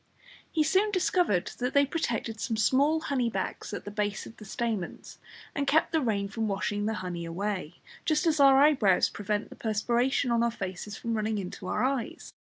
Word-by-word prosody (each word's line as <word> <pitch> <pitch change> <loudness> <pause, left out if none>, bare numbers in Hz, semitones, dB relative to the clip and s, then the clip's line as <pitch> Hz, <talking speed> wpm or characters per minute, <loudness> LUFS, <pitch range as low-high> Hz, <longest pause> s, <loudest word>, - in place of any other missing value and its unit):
He 315 - +2
soon 385 +7 +3
discovered 355 - +1
that 250 +2 -2
they 280 0 +6
protected 235 -7 -2
some 225 - -2
small 280 +8 +3
honey 255 -6 0
bags - - -4
at 205 - -6
the 205 - -6
base 205 -1 -2
of 225 - -12
the 215 - -11
stamens, 215 -4 -4 0.3
and 280 -1 -2
kept 315 +3 +3
the 320 - +2
rain 205 -5 0
from 220 +2 -2
washing 205 +1 -1
the 220 - -1
honey 175 -1 -4
away, 180 0 -3 0.3
just 310 0 +1
as 315 -2 +2
our 275 -1 +7
eyebrows 265 -11 +4
prevent 205 +1 -3
the - - -9
perspiration 240 +4 +1
on 235 0 +3
our 235 - +3
faces 200 -1 -6
from 230 - -3
running 215 0 -1
into 185 -1 -6
our - - 0
eyes. 260 -3 -2
225 Hz, 195 wpm, -28 LUFS, 205-280 Hz, 0.3 s, our